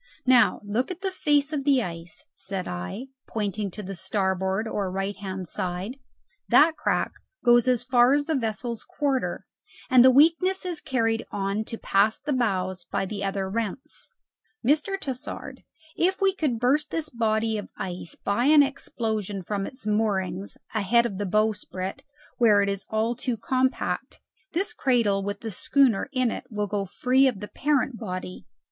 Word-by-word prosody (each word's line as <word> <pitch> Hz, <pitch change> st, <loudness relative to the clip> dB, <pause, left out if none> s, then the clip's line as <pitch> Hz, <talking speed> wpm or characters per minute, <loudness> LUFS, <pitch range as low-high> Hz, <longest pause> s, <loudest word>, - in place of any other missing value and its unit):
Now 255 Hz, -1 st, +5 dB
look 215 Hz, +5 st, -1 dB
at 370 Hz, 0 st, -6 dB
the 385 Hz, -1 st, -1 dB
face 295 Hz, -4 st, +2 dB
of 285 Hz, -2 st, -1 dB
the 270 Hz, -3 st, +3 dB
ice," 165 Hz, -2 st, -8 dB
said 190 Hz, -1 st, -5 dB
I, 90 Hz, -, -5 dB, 0.2 s
pointing 210 Hz, -1 st, -2 dB
to 210 Hz, +3 st, -8 dB
the 195 Hz, +1 st, -6 dB
starboard 190 Hz, +2 st, -1 dB
or 200 Hz, -3 st, -2 dB
right 195 Hz, +2 st, -2 dB
hand 190 Hz, -2 st, -6 dB
side; 185 Hz, -, -4 dB, 0.5 s
"that 315 Hz, +2 st, +6 dB
crack -, -, 0 dB, 0.3 s
goes 240 Hz, 0 st, +5 dB
as 250 Hz, -2 st, +2 dB
far 245 Hz, +1 st, +4 dB
as 290 Hz, 0 st, 0 dB
the 320 Hz, -, 0 dB
vessel's 230 Hz, -2 st, -2 dB
quarter, 275 Hz, -3 st, -1 dB, 0.5 s
and 255 Hz, -1 st, +8 dB
the 260 Hz, -, +8 dB
weakness 330 Hz, +8 st, +4 dB
is 350 Hz, -3 st, -2 dB
carried 225 Hz, -3 st, 0 dB
on 200 Hz, +2 st, -1 dB
to 230 Hz, -, -5 dB
past 215 Hz, +8 st, +1 dB
the 295 Hz, -, 0 dB
bows 190 Hz, -7 st, -1 dB
by 195 Hz, -, -2 dB
the 200 Hz, +1 st, -5 dB
other 195 Hz, -1 st, -1 dB
rents. 225 Hz, +4 st, -4 dB, 0.6 s
Mr. 315 Hz, +8 st, +2 dB
Tassard, 265 Hz, -7 st, -6 dB, 0.3 s
if 375 Hz, +3 st, +1 dB
we 390 Hz, -1 st, +3 dB
could 295 Hz, -10 st, -1 dB
burst 285 Hz, +5 st, +2 dB
this 315 Hz, -2 st, -2 dB
body 220 Hz, -2 st, 0 dB
of 205 Hz, -, -8 dB
ice 180 Hz, -2 st, -5 dB
by 205 Hz, +5 st, 0 dB
an 295 Hz, 0 st, +7 dB
explosion 220 Hz, -8 st, -3 dB
from 200 Hz, +1 st, -2 dB
its 255 Hz, -4 st, -9 dB
moorings 200 Hz, -3 st, -1 dB, 0.2 s
ahead 225 Hz, +2 st, +3 dB
of 200 Hz, -5 st, -3 dB
the 205 Hz, -, -1 dB
bowsprit, 210 Hz, +1 st, -1 dB, 0.4 s
where 210 Hz, -4 st, +5 dB
it 200 Hz, -, 0 dB
is 200 Hz, 0 st, -4 dB
all 220 Hz, +2 st, +1 dB
too 240 Hz, 0 st, -2 dB
compact, 260 Hz, +4 st, -1 dB, 0.3 s
this 380 Hz, +5 st, -1 dB
cradle 230 Hz, -7 st, +2 dB
with 200 Hz, +1 st, -4 dB
the 225 Hz, -, -4 dB
schooner 250 Hz, +2 st, +2 dB
in 255 Hz, -4 st, +1 dB
it -, -, -5 dB
will 210 Hz, -3 st, -2 dB
go 200 Hz, 0 st, -2 dB
free 255 Hz, +7 st, +3 dB
of 240 Hz, -7 st, -1 dB
the 210 Hz, -, -6 dB
parent 270 Hz, -4 st, 0 dB
body." 185 Hz, -4 st, -6 dB
225 Hz, 170 wpm, -26 LUFS, 195-265 Hz, 0.6 s, and